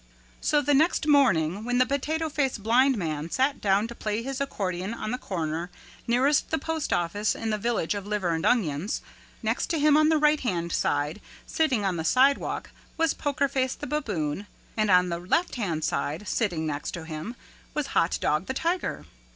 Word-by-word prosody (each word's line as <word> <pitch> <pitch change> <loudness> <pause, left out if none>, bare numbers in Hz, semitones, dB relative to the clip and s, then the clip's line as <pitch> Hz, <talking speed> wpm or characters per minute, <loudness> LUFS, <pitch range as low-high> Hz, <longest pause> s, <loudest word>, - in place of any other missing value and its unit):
So 295 -2 +3
the 290 +1 +2
next 310 +3 +3
morning 200 - +3
when 245 +1 0
the 255 - +5
Potato 310 +4 -1
Face 285 -4 0
Blind 240 +5 +3
Man 155 -3 -3
sat 265 +8 0
down 200 +2 +2
to 235 - -8
play 215 0 -3
his 270 +1 -4
accordion 190 -5 -2
on 215 - -4
the 250 - -2
corner 165 -1 -3 0.4
nearest 260 +5 +2
the 320 - +1
postoffice 215 - -1
in 225 -1 -3
the 215 - 0
Village 230 -6 0
of 205 -1 -5
Liver 205 -4 -1
and 160 -1 -1
Onions, 185 - +1 0.4
next - - 0
to 335 - +1
him 300 0 +4
on 310 0 +5
the 320 - +4
right 300 0 +4
hand 170 -8 -2
side 145 +1 0 0.2
sitting 260 -10 +1
on 185 -3 0
the 160 - -2
sidewalk 265 +10 +2 0.3
was 325 -2 +2
Poker 280 -1 0
Face 260 -2 -1
the - - -7
Baboon 205 - -2 0.3
and 215 -1 +1
on 180 -1 +5
the 170 0 -2
left 190 - 0
hand 170 -10 -2
side 150 +8 -2
sitting 180 -9 0
next 145 -1 -3
to 165 -2 -7
him 160 +9 -6 0.4
was 300 - 0
Hot 165 - +2
Dog 155 +5 0
the 260 - -3
Tiger. 340 +5 -1
220 Hz, 190 wpm, -26 LUFS, 170-280 Hz, 0.4 s, the